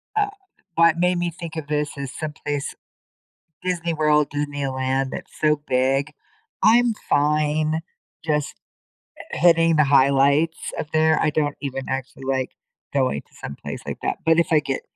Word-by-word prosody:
Uh, 410 -1 +2 0.5
what 165 0 +4
made 180 0 +2
me 175 -1 -1
think 165 -1 -8
of 160 -3 -4
this 150 -1 -2
is 140 -2 -5
some 155 -1 -4
place 145 -1 -2 0.9
Disney 170 -2 -1
World, 150 -1 +3
Disneyland, 135 -2 -2
that's - - -7
so 150 -1 +2
big. 135 +3 +1 0.5
I'm 235 0 +5 0.2
fine 150 +2 +2 0.5
just 150 -2 -1 0.8
hi - - -3
hitting 165 -1 +5
the 150 - +5
highlights 140 +3 +3
up 150 - -5
there. 160 0 +3
I 155 - +2
don't 145 -1 0
even 135 -2 -4
actually 135 0 -4
like 130 -1 -1 0.4
going 130 - +1
to - - -30
some 70 - -6
place - - -7
like - - -5
that. - - -1
But, 165 +1 +4
if 170 - +3
I 155 - +5
get 135 -2 -3
150 Hz, 160 wpm, -23 LUFS, 140-160 Hz, 0.9 s, I'm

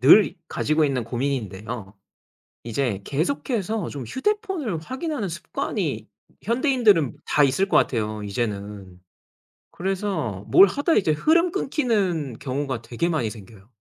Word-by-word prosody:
늘 175 - +7
가지고 155 +1 +1
있는 130 -4 -1
고민인데요. 115 -4 -3 0.7
이제 115 -3 -1
계속해서 215 - -1
좀 140 -3 -6
휴대폰을 375 - -1
확인하는 260 - -3
습관이 170 -1 -3 0.4
현대인들은 235 - +3
다 150 - +3
있을 140 +8 +2
것 - - +4
같아요, 110 -3 0
이제는. 100 -3 -4 0.7
그래서 185 - -2
뭘 195 - +8
하다 285 - +1
이제 185 - +3
흐름 335 - +3
끊기는 205 - 0
경우가 130 -3 -3
되게 125 +9 -1
많이 145 -10 0
생겨요. 105 -2 -13
150 Hz, 290 characters per minute, -24 LUFS, -, 0.7 s, 뭘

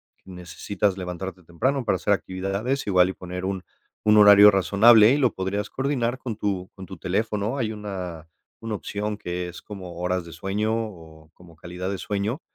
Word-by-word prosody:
que 95 - -16
necesitas 95 +2 -3
levantarte 90 0 -6
temprano, 125 - -1
para 105 -4 +1
hacer 100 - +1
actividades, 100 +8 -2
igual 90 -1 +4
y - - -4
poner 90 0 -7
un 95 -1 -2 0.4
un 105 0 +5
horario 105 0 +9
razonable, 105 +4 +6
y - - +2
lo 125 -5 +2
podrías 100 +2 -3
coordinar 130 -2 -1
con 120 -5 -5
tu 95 -3 -3
con 95 -1 -9
tu 95 +1 -10
teléfono. 105 +6 -2
Hay 110 -4 -1
una 90 -6 -6 0.3
una 115 -1 -4
opción, 105 +1 -4
que 90 -2 -4
es 90 - -10
como 95 -4 -9
horas 90 -1 -1
de 85 - -11
sueño, 105 +5 -2
o 80 -8 -7
como 85 -2 -17
calidad 90 +3 -6
de 100 - -3
sueño, 105 - -3
100 Hz, 180 wpm, -24 LUFS, 90-105 Hz, 0.4 s, horario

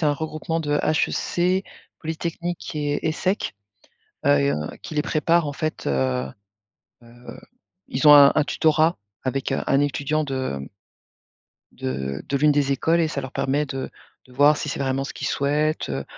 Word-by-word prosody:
c'est 155 - +2
un 145 - +3
regroupement 160 +2 -3
de 145 -1 0
HEC, 180 +4 +1 0.4
Polytechnique 170 +1 -4
et 145 +1 -1
ESEC. 185 +6 -1 0.7
Heu 70 - +5
et 70 0 +2
heu, - - +1 0.3
qui 155 - -8
les 150 - +1
préparent 160 +1 +2
en 145 - -3
fait, 155 +2 -4
heu, 65 -2 0 0.8
heu, 120 +1 -12 0.5
ils 140 +4 +1
ont 150 - +11
un 140 -1 +9
un 155 - +4
tutorat, 160 +2 +2 0.3
avec, 135 +1 -2
heu, - - 0
un 135 - +3
étudiant 145 +2 0
de, 130 - -3
hem, 70 - -7 1.1
de 65 +1 -4
de 140 - 0
l'une 150 +2 +4
des 140 -1 +1
écoles 165 +5 +2
et 160 - +2
ça 140 - -3
leur 130 0 -7
permet 140 +2 0
de 135 -2 -5 0.4
de 125 - -18
voir 145 +3 +5
si - - -4
c'est 145 - -3
vraiment 135 0 -1
ce - - -7
qu'ils - - -5
souhaitent, 150 +2 0
heu, - - -3
145 Hz, 180 wpm, -23 LUFS, 135-155 Hz, 1.1 s, ont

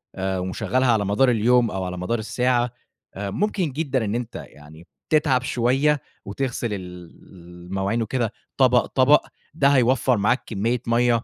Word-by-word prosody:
آآ، 95 0 -2
ومشغّلها 110 +7 0
على 105 -3 +1
مدار 115 +6 +3
اليوم، 120 +1 +3
أو 95 - -3
على 90 0 -5
مدار 110 +6 -2
الساعة، 120 +2 0 0.5
ممكن 165 - -1
جدًا 135 -5 -1
إن 105 - -2
أنت 120 -1 -5
يعني 75 +3 -12 0.2
تتعب 150 -5 +3
شوية 135 +5 +1 0.2
وتغسل 120 +1 -3
ال 90 -3 -8 0.6
المواعين 95 +5 -2
وكده، 115 0 -2 0.2
طبق، 125 -2 +4
طبق 140 +3 +3 0.3
ده 145 -3 +2
هيوفّر 130 -2 +3
معاك 110 +6 +1
كمية 115 +3 -1
مَيّة 120 0 +2
120 Hz, 145 wpm, -23 LUFS, 100-130 Hz, 0.6 s, طبق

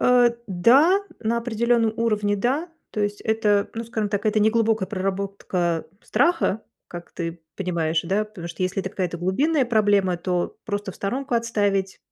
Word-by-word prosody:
Э, 245 -1 +5 0.2
да, 265 - +5 0.2
на 230 +1 0
определённом 235 -1 +1
уровне 210 -3 +1
да. 270 - 0 0.2
То 215 - -3
есть 205 0 -1
это, 210 -2 +1
ну, 230 +1 -4
скажем 220 -3 -2
так, 205 +1 -2
это 215 0 +2
неглубокая 220 -2 +2
проработка 190 -3 -2 0.2
страха, 250 - +1 0.3
как 175 0 -9
ты 165 -1 -5 0.2
понимаешь, 170 -4 0
да. 195 +5 0
Потому 190 -5 -9
что 170 - -5
если 185 +2 0
это 190 - -5
какая-то 175 -3 -3
глубинная 265 - +1
проблема, 205 -5 +3
то 175 0 -2
просто 205 -3 -3
в - - -16
сторонку 255 +5 -2
отставить 205 -4 0
205 Hz, 160 wpm, -23 LUFS, 190-230 Hz, 0.3 s, Э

